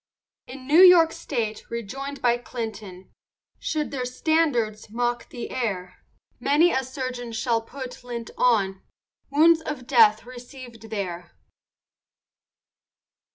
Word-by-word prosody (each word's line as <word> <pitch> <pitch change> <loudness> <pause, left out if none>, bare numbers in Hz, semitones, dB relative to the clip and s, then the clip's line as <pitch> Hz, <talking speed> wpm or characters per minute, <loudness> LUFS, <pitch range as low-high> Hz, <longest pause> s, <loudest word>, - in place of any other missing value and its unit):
In 255 +1 -10
New 300 +5 +4
York 350 -3 +8
state, 225 -9 -3
rejoin'd 265 +5 -6
by 240 -1 +3
Clinton, 215 -6 -7 0.5
Should 305 -1 -2
their 265 -3 -3
standards 250 -6 0
mock 240 +1 -2
the 240 - -7
air, 195 -8 -4 0.4
Many 310 +5 +3
a 265 - 0
surgeon 255 -2 -5
shall 230 0 0
put 250 +1 -9
lint 235 -2 -6
on 195 -6 +2 0.5
Wounds 320 +3 +5
of 295 -5 -6
death 220 -4 +5
receivèd 245 -2 -12
there. 180 -5 -5
245 Hz, 110 wpm, -24 LUFS, 220-275 Hz, 0.5 s, York